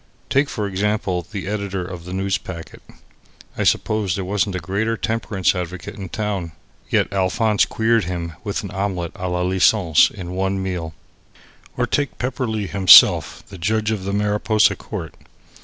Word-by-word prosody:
Take, 140 +1 +3
for 105 - -3
example, 95 -3 -1
the 100 -3 -5
editor 100 -2 -3
of 90 -2 -8
the 90 - -8
Newspacket. 95 -3 -4 0.7
I - - -1
suppose 105 -4 +1
there 95 - -3
wasn't 100 0 -1
a - - -1
greater 105 +6 -1
temperance 105 -5 0
advocate 90 -1 -5
in 95 -3 -8
town. 100 -5 -3 0.4
Yet - - +1
Alphonse 105 +3 +2
queered 115 -2 +1
him 85 -1 -4
with 100 0 -3
an 100 - -6
Omelette 95 -4 -2
a 90 - -4
la 90 0 -1
License 90 -2 +4
in 90 -4 -8
one 95 +1 -1
meal. 85 -4 -4 0.8
Or - - +2
take 145 -1 -1
Pepperleigh 125 -4 -2
himself, 95 -2 +6
the 95 -2 -10
judge 110 +4 0
of 105 -4 -3
the 100 - -3
Mariposa 105 +1 +2
court. 90 -7 -7
95 Hz, 155 wpm, -21 LUFS, 90-105 Hz, 0.8 s, himself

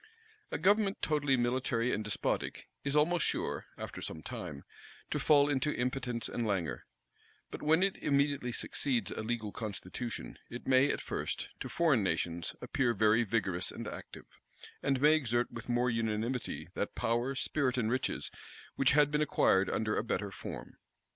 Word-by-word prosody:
A - - -2
government 200 +3 +3
totally 145 -3 +2
military 120 0 +1
and 105 - -1
despotic, 105 -1 -2 0.2
is 140 +1 -1
almost 160 +2 +3
sure, - - -1
after - - -6
some 80 - -6
time, 70 - -6 0.5
to - - 0
fall 145 -2 +5
into 145 +1 +1
impotence 125 -2 -1
and 120 - -2
languor: 95 -8 -1 0.6
but - - -6
when 160 +4 +4
it 195 -1 +1
immediately 140 -3 +1
succeeds 125 +1 -1
a - - -3
legal 110 -1 -2
constitution, 110 +2 -5
it 120 - -7
may, 130 +2 +5
at - - -1
first, - - -3
to - - -5
foreign 155 -9 +3
nations 85 -2 -1
appear 120 -3 +1
very 110 +3 +4
vigorous 95 -5 0
and - - -6
active, - - -8 0.6
and 135 -1 +1
may 150 +3 +6
exert 120 -6 +1
with - - -8
more 120 +1 +2
unanimity 115 +2 -2
that - - -3
power, 120 +4 0
spirit, 130 -1 +1
and 115 -2 +1
riches, 130 +1 -1 0.4
which 135 - +4
had 145 -1 +5
been 150 0 +2
acquired 95 -9 +3
under 105 -1 0
a - - 0
better 100 -3 -2
form. 95 - -8
125 Hz, 160 wpm, -32 LUFS, 110-140 Hz, 0.6 s, may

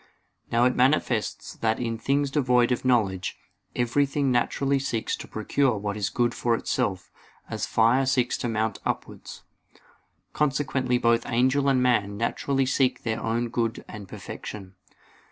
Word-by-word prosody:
Now 120 +1 +4
it 125 - +4
is - - -8
manifest 125 -4 0
that 110 -1 +1
in 115 -2 -2
things 140 +3 0
devoid 125 -4 +3
of 125 - 0
knowledge, 100 -9 +1 0.4
everything 135 +3 +1
naturally 135 +3 +1
seeks 120 -5 -2
to - - -9
procure 120 +3 0
what 100 0 -3
is 105 -2 -1
good 120 -1 0
for 120 -1 +1
itself; 95 -4 -2 0.4
as - - -2
fire 120 +4 +3
seeks 130 -2 +1
to 120 - -2
mount 110 -1 -1
upwards. - - -5 0.9
Consequently 135 -3 0
both 115 -1 +2
angel 130 +4 +2
and 130 -2 +3
man 105 -5 +1
naturally 135 +4 0
seek 130 0 +1
their 115 -1 -2
own 115 +1 -1
good 115 0 -2
and 105 -2 -9
perfection. 95 -1 -8
120 Hz, 150 wpm, -26 LUFS, 110-135 Hz, 0.9 s, Now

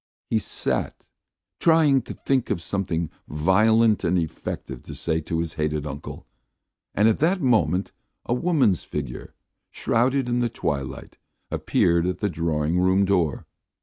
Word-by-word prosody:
He 110 - +3
sat - - -2 0.5
trying 160 -5 +4
to - - -5
think 130 -3 0
of - - 0
something 85 -2 -2 0.2
violent 110 +8 +3
and 90 +1 +2
effective 75 -5 -4
to - - -9
say 80 -1 -1
to 80 +1 -3
his 80 -1 -2
hated 75 -1 -1
uncle, 70 0 -7 0.7
and 105 +2 +4
at 110 - +2
that 175 +5 +2
moment 105 - +2 0.3
a - - 0
woman's 130 - +2
figure, - - -6 0.3
shrouded 130 +3 +1
in 120 0 0
the 120 -1 +1
twilight, 70 - -4 0.3
appeared 85 0 +2
at 90 - -1
the 105 -2 -1
drawing 80 0 0
room 95 +2 +3
door. 90 -7 0
95 Hz, 145 wpm, -24 LUFS, 80-120 Hz, 0.7 s, trying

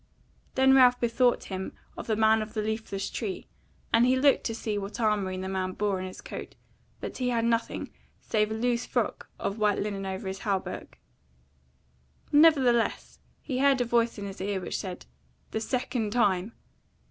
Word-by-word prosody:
Then 265 0 +5
Ralph 250 -2 +6
bethought 240 +1 +2
him 190 -1 -5 0.2
of - - -7
the 220 - +1
man 220 0 +4
of 215 +1 -7
the 215 - 0
leafless 215 -2 -3
tree, 205 -6 -4 0.5
and 230 +1 +6
he 255 +1 +4
looked 275 +1 +4
to 225 - -1
see 220 -2 -3
what 205 +3 -5
armoury 205 -4 +1
the 190 0 -4
man 185 -1 -2
bore 200 -2 0
on 185 - -4
his 185 - -9
coat; - - -8 0.5
but - - -5
he 250 -1 0
had 230 -2 +1
nothing 230 0 -1 0.3
save 215 -1 0
a 220 - -3
loose 240 +1 0
frock - - -2
of 200 +2 -3
white 210 -1 +3
linen 200 -1 -3
over 190 0 -4
his 190 0 -4
hauberk. 195 -3 -3 1.3
Nevertheless, 275 -7 +4 0.2
he 255 -3 -2
heard 275 -1 +4
a 245 - +1
voice 235 -1 +1
in 200 - -5
his 195 -1 -7
ear, 200 0 -1
which 180 - -4
said, 185 -2 -6 0.5
"The 220 - -2
second 230 -3 -2
time!" 205 -3 +2
220 Hz, 180 wpm, -28 LUFS, 195-245 Hz, 1.3 s, Ralph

